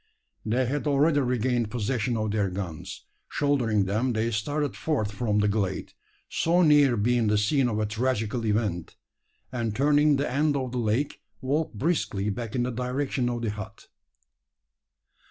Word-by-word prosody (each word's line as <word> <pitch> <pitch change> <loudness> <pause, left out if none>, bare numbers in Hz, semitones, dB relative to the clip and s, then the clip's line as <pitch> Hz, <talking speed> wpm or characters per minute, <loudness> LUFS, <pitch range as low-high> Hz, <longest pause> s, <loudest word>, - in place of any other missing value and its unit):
They 120 +4 +1
had 145 +4 -2
already 145 +1 +3
regained 125 -3 0
possession 120 +1 -1
of 110 -1 -1
their 100 -2 0
guns. 90 -4 -6 0.2
Shouldering 120 -8 +1
them, 110 +6 0
they 110 +1 0
started 145 +7 -1
forth 120 -10 -1
from 105 -1 -1
the 105 0 +3
glade 100 -2 -2 0.3
so 175 +2 +2
near 145 -6 +5
being 115 +2 +2
the 105 0 +3
scene 125 +5 +2
of 105 - -2
a 110 - +1
tragical 110 +1 -1
event 105 -5 -1 0.6
and, 115 -4 -2
turning 145 +2 +4
the 140 +1 0
end 145 +2 +1
of 130 -2 -3
the 125 - -2
lake, 115 +5 -1 0.2
walked 140 -1 -1
briskly 110 - 0
back 115 +2 -5
in 125 - +1
the 125 - -1
direction 125 +1 -1
of 120 -1 -3
the 110 - 0
hut. 105 +1 -9
120 Hz, 160 wpm, -26 LUFS, 105-140 Hz, 0.6 s, near